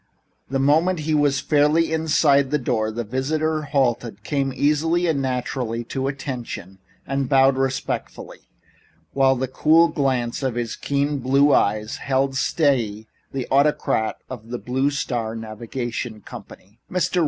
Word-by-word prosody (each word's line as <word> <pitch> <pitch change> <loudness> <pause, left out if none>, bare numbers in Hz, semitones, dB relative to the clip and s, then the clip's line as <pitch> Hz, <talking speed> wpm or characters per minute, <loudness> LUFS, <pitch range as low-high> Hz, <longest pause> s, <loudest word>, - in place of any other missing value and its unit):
The 135 - 0
moment 155 +6 +2
he 155 +1 -1
was 145 -2 +2
fairly 155 +2 +2
inside 150 -3 +3
the 150 - +1
door 120 -5 -1
the 115 +2 -4
visitor 155 +7 -1
halted, 120 -7 -1
came 135 +3 -1
easily 160 +6 +1
and 155 -5 +1
naturally 125 -2 -2
to 135 0 -1
"attention" 125 - -6 0.3
and 135 -1 -2
bowed 135 -1 +5
respectfully, 130 0 -3 0.7
while 135 -1 +4
the 130 +1 -2
cool 160 +6 +4
glance 130 -4 -1
of 130 -3 -1
his 120 -2 -3
keen 140 0 -1
blue 140 +3 +3
eyes 105 +1 +1
held 135 0 0
steadily 120 -8 0 0.2
the 135 -2 -4
autocrat 135 -5 +2
of 115 -3 -9
the 120 - -3
Blue 130 +3 0
Star 120 -6 -3
Navigation 115 +1 -5
Company. 100 +2 -12
"Mr. 180 0 0
135 Hz, 140 wpm, -22 LUFS, 120-145 Hz, 0.7 s, bowed